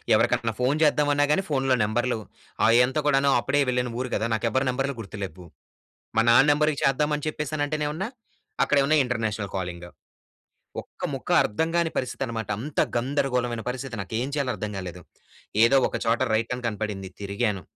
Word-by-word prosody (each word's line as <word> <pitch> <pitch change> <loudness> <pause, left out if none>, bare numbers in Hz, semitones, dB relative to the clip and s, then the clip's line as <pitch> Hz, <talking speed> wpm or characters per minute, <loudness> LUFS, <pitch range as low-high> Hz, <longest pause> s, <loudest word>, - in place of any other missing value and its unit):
ఎవరికన్నా 115 -1 +1
ఫోన్ 135 +4 +2
చేద్దామన్నా 145 -1 +3
గాని, 190 +5 +2
ఫోన్‌లో 135 -2 +2
నంబర్‌లు 120 +3 0 0.5
ఆహ్, 115 - +5
ఎంత 130 +4 -4
కూడాను 140 -1 +3
అప్పుడే 140 +4 +1
వెళ్ళిన 125 -1 0
ఊరు 125 - -3
గదా! 110 - 0
నాకు 110 +1 0
ఎవ్వరి 130 +2 +1
నంబర్‌లు 135 +2 -1
గుర్తు 105 0 -9
లేవు. 90 0 -8 0.7
మా 115 - +5
నాన్న 125 +4 +6
నంబర్‌కి 150 0 +1
చేద్దాం 140 +3 +2
అని 145 - -6
చెప్పేసానంటేనేవన్నా 150 +3 -2 0.6
అక్కడ - - +1
ఏవన్నా 150 +3 +3
ఇంటర్నేషనల్ 110 -5 -2
కాలింగ్. 90 -1 -5 1.0
ఒక్క - - -16
ముక్క - - -6
అర్థం 160 +10 -1
గాని 170 -1 +2
పరిస్థితనమాట. 120 -3 -3
అంత 140 +5 -4 0.2
గందరగోళమైన 125 -2 0
పరిస్థితి. 130 -1 -5
నాకేం 110 +6 -3
చేయాలో 140 -3 0
అర్థం 105 - -4
గాలేదు. 90 -1 -6 0.6
ఏదో 115 +4 +5
ఒక - - -3
చోట 115 +1 +2
రైట్ 115 +2 0
అని 125 - -7
కనపడింది, 105 -3 -4
తిరిగాను. 100 -1 -1
125 Hz, 160 wpm, -25 LUFS, 110-145 Hz, 1.0 s, నాన్న